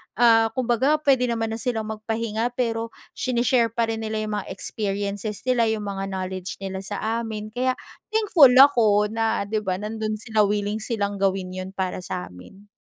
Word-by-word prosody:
ah, 225 -1 +5
kumbaga 255 +3 +2
pwede 265 -4 +3
naman 225 -1 -1
na 225 - -4
silang 220 -3 -2
magpahinga, 225 +2 -2
pero 230 -2 -1 0.2
sene-share 240 -1 +1
pa 235 - +2
rin 225 - -3
nila 220 0 -3
yung 215 - -4
mga 195 - -8
experiences 205 0 -4
nila, 245 -3 +2
yung 220 -1 -1
mga 195 -1 -4
knowledge 185 -1 -4
nila 190 0 -4
sa 210 +4 -2
amin. 215 -2 -5
Kaya 255 +2 0 0.4
thankful 340 - +6
ako 220 -6 +6
na, 225 -2 0
'di 215 +2 -1
ba, 190 -3 -2
nandun 215 +2 -3
sila, 215 -1 +1
willing 205 +1 -1
silang 205 -3 -2
gawin 190 -1 0
yun 185 +1 -7
para 185 -1 -2
sa 90 - -5
amin. 195 - -15
220 Hz, 175 wpm, -24 LUFS, 200-235 Hz, 0.4 s, thankful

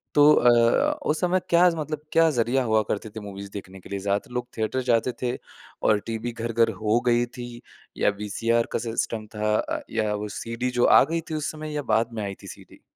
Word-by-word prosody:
तो 150 +1 +7
अ, 120 - +4
उस 155 - +1
समय 180 +1 +2
क्या 175 +1 +6
ज़ 170 - -3
मतलब 155 -1 -4
क्या 165 0 +5
ज़रिया 120 +3 +2
हुआ 110 -2 +2
करते 110 +2 -2
थे 110 - -8
मूवीज़ 100 -1 -8
देखने 95 -1 -8
के - - -14
लिए? 100 - -3
ज़्यादातर 100 +4 -2
लोग 125 0 -3
थिएटर 110 +4 -1
जाते 115 +2 +2
थे 125 0 0 0.5
और 105 - +4
टीवी 115 +1 -3
घर-घर 115 0 +1
हो 110 +2 +3
गई 120 0 +3
थी, 120 -1 -9 0.4
या - - +3
वीसीआर 115 +3 0
का - - +1
सिस्टम 115 -1 -3
था 105 0 +1
अ, - - -3
या 110 -2 0
वो 105 0 -4
सीडी 115 +2 -3
जो - - +5
आ - - +7
गई 165 +4 -2
थी - - -1
उस 155 -1 -2
समय 155 -1 -7
या 145 - -1
बाद 115 +1 +1
में 110 -2 -3
आई 100 -1 -4
थी - - -10
सीडी? - - -13
115 Hz, 220 wpm, -25 LUFS, 110-135 Hz, 0.5 s, तो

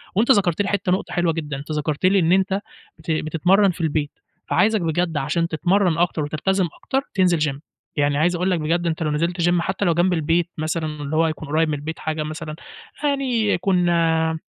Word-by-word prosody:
وأنت 230 +6 +4
ذكَرت 195 -4 +3
لي 200 - -1
حِتّة 200 -2 0
نقطة 185 - -1
حلوة 175 -2 +1
جدًا. 150 -4 -4
أنت 145 +3 -8
ذكَرت 150 +2 -1
لي 195 +1 +4
إن 165 0 +2
أنت 190 +1 +2 0.4
بت 165 - -4
بتتمرّن 175 +6 +2
في 170 - -8
البيت، 150 -2 -1 0.4
فعايزك 215 -1 +2
بجد 165 0 -1
عشان 155 +4 0
تتمرّن 175 +1 +1
أكتر 170 -3 +1
وتلتزم 180 +5 0
أكتر 270 - -2
تنزِل 180 -4 +2
gym 135 - -11 0.4
يعني 145 -1 +1
عايز 175 +4 +2
أقول 180 +2 0
لك 175 - +1
بجد 170 +3 0
أنت 160 0 -1
لو 150 - 0
نزِلت 170 +4 -1
gym 175 0 +2
حتى 190 +3 -2
لو 170 - +3
جنب 175 +2 +2
البيت 165 +1 +1
مثلًا، 160 +1 -2 0.2
اللي 145 +2 -3
هو 165 +1 +3
يكون 155 -1 -5
قريب 160 +1 +2
من 150 - 0
البيت 155 +3 -6
حاجة 155 -1 -2
مثلًا، 155 0 -6 0.5
يعني 265 -6 +1
يكون 180 -1 +1
آآ 160 -1 +1
170 Hz, 205 wpm, -22 LUFS, 155-185 Hz, 0.5 s, وأنت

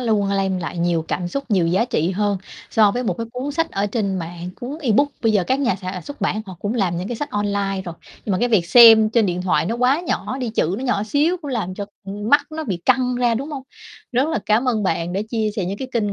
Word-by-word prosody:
luôn 215 -5 +1
lem 195 -1 0
lại 170 0 -5
nhiều 170 -2 +1
cảm 175 -1 -2
xúc 275 +8 -3
nhiều 185 -5 +3
giá 185 +7 +2
trị 175 -8 0
hơn 200 +1 0 0.3
so 215 -2 +5
với 245 +4 -2
một 190 -7 -1
cái 230 - -3
cuốn 265 +3 -4
sách 330 +3 0
ở 200 +1 -1
trên 200 -2 -1
mạng. 170 +1 -6
Cuốn 270 +5 -5
ebook 280 +3 +3
bây 225 -2 +3
giờ 200 -4 +2
các 260 +6 0
nhà 250 -8 +2
sản 185 -1 -5
xuất 285 -4 -9
bản 215 +2 -1
họ 185 -2 -9
cũng 210 +3 -2
làm 185 -6 0
những 180 +3 -4
cái 240 - -3
sách 290 +5 -4
online 200 -2 -1
rồi 170 - -6 0.3
nhưng 205 - -1
mà 185 - +1
cái 245 - +1
việc 195 -7 +2
xem 225 0 +8
trên 225 -2 +3
điện 180 0 -2
thoại 180 -3 +1
nó 230 +5 -1
quá 255 +5 +2
nhỏ 295 -6 -3
đi, 250 -3 -2
chữ 185 -4 0
nó 265 - -5
nhỏ 225 -5 +1
xíu 295 +10 +1
cũng 285 - -5
làm 200 -7 -2
cho, 200 0 -5 0.2
ưm, 205 +2 -5
mắt 290 +3 +6
nó 315 0 -5
bị 190 -6 -2
căng 255 -1 +3
ra, 240 -2 +2
đúng 275 +6 -4
hông? 275 -3 -5 0.5
Rất 260 +5 +2
là 320 - 0
cám 230 +5 +2
ơn 220 -3 +1
bạn 170 -2 -1
đã 195 - -1
chia 220 -2 0
sẻ 190 - 0
những 195 +3 -4
cái 260 - -5
kinh 210 -4 0
215 Hz, 275 wpm, -21 LUFS, 190-250 Hz, 0.5 s, xem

